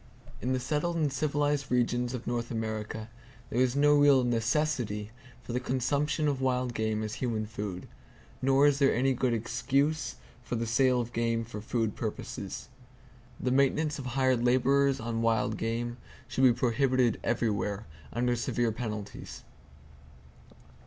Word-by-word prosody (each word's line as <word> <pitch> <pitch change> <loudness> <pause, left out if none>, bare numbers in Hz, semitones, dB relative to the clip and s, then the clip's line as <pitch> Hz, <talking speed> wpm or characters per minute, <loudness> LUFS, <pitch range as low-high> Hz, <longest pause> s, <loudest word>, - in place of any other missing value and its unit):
In 125 - -1
the 130 - +1
settled 150 +6 -1
and 150 -4 0
civilized 145 -1 0
regions 125 0 +1
of 125 - -7
North 120 -1 -2
America 110 -1 -4 0.4
there 120 - +1
is 130 0 +2
no 145 +1 +5
real 145 -3 +6
necessity 120 -3 0 0.3
for 120 - -6
the 125 - +1
consumption 140 +5 0
of 140 -2 0
wild 125 -1 0
game 110 -1 -1
as 110 0 -4
human 115 -4 -1
food: 100 -4 -5 0.5
nor 135 +2 +4
is 145 -1 +4
there 140 -1 +4
any 130 +3 +2
good 130 -1 0
excuse 130 +4 0 0.3
for 120 - -4
the 115 0 -1
sale 125 +2 +3
of 120 0 -4
game 115 0 0
for 110 -2 -7
food 110 -1 -1
purposes. - - -5 0.7
The 125 - 0
maintenance 140 +3 +2
of 130 - -5
hired 130 -1 +1
laborers 135 +2 +3
on 115 -1 -2
wild 110 -2 +1
game 120 +2 -2 0.3
should 130 - +2
be 125 - +8
prohibited 125 -1 +2
everywhere, 105 -3 -1 0.3
under 120 +1 +1
severe 120 -1 0
penalties. 110 -2 -6
125 Hz, 150 wpm, -29 LUFS, 115-135 Hz, 0.7 s, be